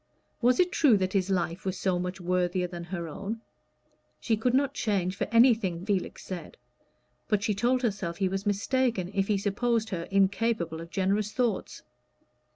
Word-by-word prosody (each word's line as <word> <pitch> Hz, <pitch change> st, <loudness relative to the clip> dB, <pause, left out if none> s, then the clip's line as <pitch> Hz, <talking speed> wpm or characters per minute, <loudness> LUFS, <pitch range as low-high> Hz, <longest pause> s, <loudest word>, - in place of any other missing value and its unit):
Was 250 Hz, +5 st, +4 dB
it 360 Hz, 0 st, +4 dB
true 270 Hz, -, +5 dB
that 185 Hz, -1 st, -1 dB
his 195 Hz, -1 st, +1 dB
life 180 Hz, -1 st, -1 dB
was 190 Hz, -1 st, -2 dB
so 185 Hz, -1 st, 0 dB
much 180 Hz, +1 st, -4 dB
worthier 180 Hz, 0 st, 0 dB
than 175 Hz, -1 st, -6 dB
her 175 Hz, -1 st, -4 dB
own? 200 Hz, +8 st, -5 dB, 0.8 s
She 225 Hz, -, +1 dB
could 245 Hz, +3 st, +1 dB
not 275 Hz, 0 st, +2 dB
change 195 Hz, -8 st, 0 dB
for -, -, -1 dB
anything 225 Hz, -7 st, +4 dB
Felix 200 Hz, -4 st, -2 dB
said, 185 Hz, -, -7 dB, 0.7 s
but 210 Hz, -2 st, +1 dB
she 215 Hz, -, +1 dB
told 245 Hz, +5 st, +1 dB
herself 190 Hz, -7 st, -2 dB
he 195 Hz, -, +1 dB
was 195 Hz, +2 st, -3 dB
mistaken 205 Hz, -2 st, 0 dB
if 195 Hz, -1 st, +1 dB
he 210 Hz, -, +2 dB
supposed 220 Hz, +3 st, 0 dB
her 170 Hz, -4 st, -4 dB
incapable 195 Hz, -4 st, +1 dB
of 165 Hz, -, -9 dB
generous 200 Hz, +3 st, 0 dB
thoughts. 240 Hz, -6 st, -1 dB
195 Hz, 170 wpm, -28 LUFS, 180-230 Hz, 0.8 s, true